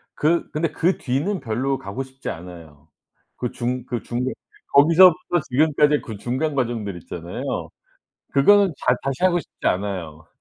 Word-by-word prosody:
그 165 +3 +1
근데 155 0 -1
그 175 +4 +1
뒤는 150 +10 -1
별로 130 +4 -1
가고 100 +8 -5
싶지 130 0 -8
않아요. 80 -3 -10 0.5
그 125 - -3
중 125 +1 -3
그 120 -3 -3
중에 120 - -4 0.5
거기서부터 175 +4 +6
지금까지 150 +2 +3
그 110 -3 -8
중간 130 +7 -2
과정들 115 -7 -2
있잖아요. 85 +1 -5 0.6
그거는 195 +7 +5
자 125 - +2
다시 135 +6 -2
하고 175 -1 +4
싶지 - - -9
않아요. 90 -5 -2
130 Hz, 300 characters per minute, -22 LUFS, 105-155 Hz, 0.6 s, 거기서부터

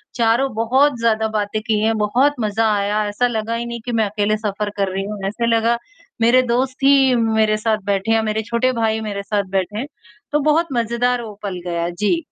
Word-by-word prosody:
चारों 235 +3 +2
बहुत 255 +4 +2
ज़्यादा 220 -1 +1
बातें 215 0 -2
किए, 220 0 +1
बहुत 235 +7 +2
मज़ा 220 +1 0
आया, 205 +1 0
ऐसा 245 +4 +1
लगा 225 0 -2
ही 235 +1 -3
नहीं 235 0 -5
कि 245 - -3
मैं 220 -1 +2
अकेले 210 +1 0
सफ़र 210 -1 -3
कर 195 -1 0
रही 195 0 -2
हूँ। 210 0 -6
ऐसा 235 +4 -2
लगा 230 +1 +2 0.4
मेरे 245 +3 +5
दोस्त 255 +1 0
ही 270 -2 +5
मेरे 220 -2 +2
साथ 215 0 0
बैठे 200 +2 0
या 225 - +3
मेरे 215 +1 -1
छोटे 235 +4 0
भाई 220 0 +1
मेरे 200 -2 -4
साथ 205 0 -1
बैठे 200 +3 -2
हैं, 265 - -3 0.5
तो 295 - +2
बहुत 330 +2 +2
मज़ेदार 240 +1 0
वो 215 -2 -8
पल 185 -3 -4
गया, 170 0 -1
जी। 205 - 0
220 Hz, 205 wpm, -19 LUFS, 210-235 Hz, 0.5 s, मेरे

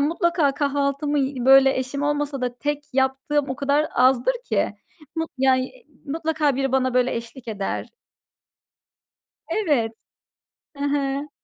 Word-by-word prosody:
mutlaka 330 -1 +2
kahvaltımı 285 +1 0
y 265 -2 -1
böyle 270 0 +7
eşim 260 +2 -3
olmasa 290 -1 -1
da 245 -1 -3
tek 295 0 -2
yaptığım 270 +2 +1
o 260 - -3
kadar 285 +2 +1
azdır 255 - +4
ki. - - 0 0.4
Mut 325 0 -2
ya, 265 0 +4 0.5
mutlaka 310 -2 0
biri 270 -1 -1
bana 260 -1 +1
böyle, 250 0 +2
eşlik 235 +1 -8
eder. 200 -3 -3 1.6
Evet. 290 - +1 0.9
Hı 280 - -4
hı. 280 0 -1
275 Hz, 125 wpm, -23 LUFS, 260-295 Hz, 1.6 s, böyle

